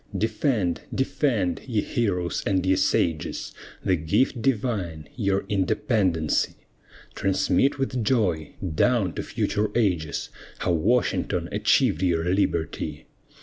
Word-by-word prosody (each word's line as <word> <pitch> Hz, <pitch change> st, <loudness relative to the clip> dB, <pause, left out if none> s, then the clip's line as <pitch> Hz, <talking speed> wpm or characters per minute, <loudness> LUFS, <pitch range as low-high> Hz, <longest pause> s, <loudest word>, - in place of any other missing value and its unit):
Defend, 110 Hz, -, 0 dB
defend, 120 Hz, -, 0 dB
ye 110 Hz, -5 st, +1 dB
heroes 90 Hz, -8 st, -1 dB
and 95 Hz, -2 st, +1 dB
ye 95 Hz, 0 st, +4 dB
sages, 85 Hz, -4 st, 0 dB, 0.3 s
The 95 Hz, -, +3 dB
gift 90 Hz, -, +1 dB
divine 105 Hz, -, -1 dB
your 100 Hz, -4 st, 0 dB
independency! 95 Hz, -, +1 dB, 0.6 s
Transmit 100 Hz, +9 st, +1 dB
with 130 Hz, -3 st, -1 dB
joy, 95 Hz, -, 0 dB, 0.2 s
down 105 Hz, -1 st, +2 dB
to -, -, -3 dB
future 105 Hz, +1 st, -1 dB
ages, 90 Hz, -10 st, 0 dB, 0.3 s
How -, -, 0 dB
Washington 105 Hz, +10 st, +1 dB
achieved 80 Hz, -, +2 dB
your 85 Hz, -3 st, +1 dB
liberty. 85 Hz, -5 st, -1 dB
95 Hz, 105 wpm, -25 LUFS, 85-115 Hz, 0.6 s, ye